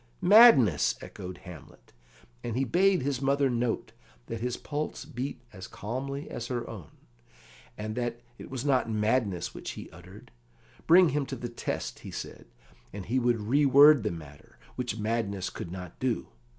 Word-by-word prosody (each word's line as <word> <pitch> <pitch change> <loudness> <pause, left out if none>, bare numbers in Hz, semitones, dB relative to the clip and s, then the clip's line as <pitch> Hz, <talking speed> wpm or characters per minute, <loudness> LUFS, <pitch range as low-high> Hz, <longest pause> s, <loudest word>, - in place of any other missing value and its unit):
"Madness!" 180 - +7
echoed 90 -1 -8
Hamlet; 75 -8 -13 0.5
and 120 0 -3
he 135 - +2
bade 180 +5 +3
his 140 -1 -2
mother 140 0 +2
note 120 -1 -1 0.3
that 115 - -6
his 125 0 -2
pulse 150 -1 -4
beat 140 -3 -5
as 95 -2 -9
calmly 135 +6 -5
as 115 - -6
her 120 -2 -3
own, 90 -9 -9 0.9
and 110 +1 -4
that 120 0 -3 0.2
it - - -9
was 130 0 -5
not 130 -4 +2
madness 105 -3 0
which - - -6
he - - -9
uttered. - - -14 0.6
Bring 175 +1 +7
him 145 -2 -1
to 135 - -4
the 120 -1 -6
test, 120 - -4
he - - -9
said, - - -8 0.4
and 100 -2 -7
he 130 +4 +1
would 120 -2 +1
re 130 +8 +2
word 145 +1 +7
the 105 - -1
matter, 75 -5 -11 0.2
which 125 -3 -3
madness 105 -4 -2
could 85 - -7
not 90 -2 -8
do. 125 -3 -1
120 Hz, 165 wpm, -28 LUFS, 105-140 Hz, 0.9 s, Madness